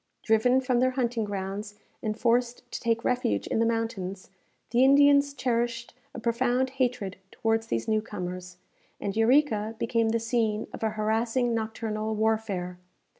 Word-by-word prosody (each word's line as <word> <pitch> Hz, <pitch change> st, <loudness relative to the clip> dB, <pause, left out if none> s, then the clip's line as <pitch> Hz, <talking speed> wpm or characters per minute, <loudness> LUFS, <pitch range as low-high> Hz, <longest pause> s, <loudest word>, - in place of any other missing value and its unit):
Driven 245 Hz, +4 st, +3 dB
from 255 Hz, -2 st, +1 dB
their 255 Hz, +1 st, +3 dB
hunting 245 Hz, -3 st, -1 dB
grounds, 205 Hz, +1 st, -5 dB, 0.3 s
and 215 Hz, 0 st, -2 dB
forced 240 Hz, +1 st, +1 dB
to -, -, -4 dB
take 230 Hz, -1 st, 0 dB
refuge 245 Hz, -, 0 dB
in -, -, -1 dB
the 230 Hz, -, +3 dB
mountains, 200 Hz, -5 st, -3 dB, 0.4 s
the 245 Hz, +2 st, +4 dB
Indians 285 Hz, +1 st, +6 dB
cherished 235 Hz, -3 st, -2 dB, 0.2 s
a -, -, -5 dB
profound 250 Hz, +2 st, +1 dB
hatred 245 Hz, -7 st, -1 dB
towards 225 Hz, +1 st, -1 dB
these 115 Hz, 0 st, -2 dB
new 215 Hz, -1 st, +2 dB
comers, 180 Hz, -3 st, -6 dB, 0.4 s
and 200 Hz, 0 st, -3 dB
Eureka 225 Hz, -2 st, +2 dB
became 230 Hz, -1 st, +1 dB
the 230 Hz, +1 st, +1 dB
scene 225 Hz, -2 st, 0 dB
of -, -, -8 dB
a 220 Hz, -, +1 dB
harassing 225 Hz, +3 st, 0 dB
nocturnal 220 Hz, -1 st, -2 dB
warfare. 210 Hz, -5 st, -1 dB
225 Hz, 150 wpm, -27 LUFS, 215-245 Hz, 0.4 s, Indians